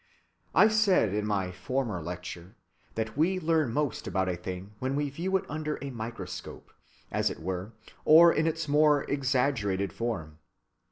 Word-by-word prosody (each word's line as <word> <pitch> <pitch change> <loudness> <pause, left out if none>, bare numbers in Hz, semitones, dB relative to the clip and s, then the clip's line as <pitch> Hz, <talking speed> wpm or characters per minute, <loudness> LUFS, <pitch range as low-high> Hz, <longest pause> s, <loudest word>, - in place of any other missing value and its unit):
I 215 - +8
said 205 - +3
in 105 0 -1
my 95 -3 -1
former 105 +1 -2
lecture 90 +3 -7 0.4
that 110 -1 -3
we 175 +6 +2
learn 160 -6 +1
most 145 -1 -1
about 95 -1 0
a 90 - -1
thing 90 +3 -7
when 130 +1 -1
we 145 -1 -1
view 185 +7 0
it - - -7
under 155 0 -3
a 140 -1 -5
microscope, 115 -1 -7 0.4
as - - +1
it - - -7
were, 95 +5 -4 0.3
or 165 +2 +8
in 155 +1 +1
its 165 0 -2
most 150 0 +4
exaggerated 125 -9 0
form. 85 -10 -4
125 Hz, 160 wpm, -29 LUFS, 95-150 Hz, 0.4 s, I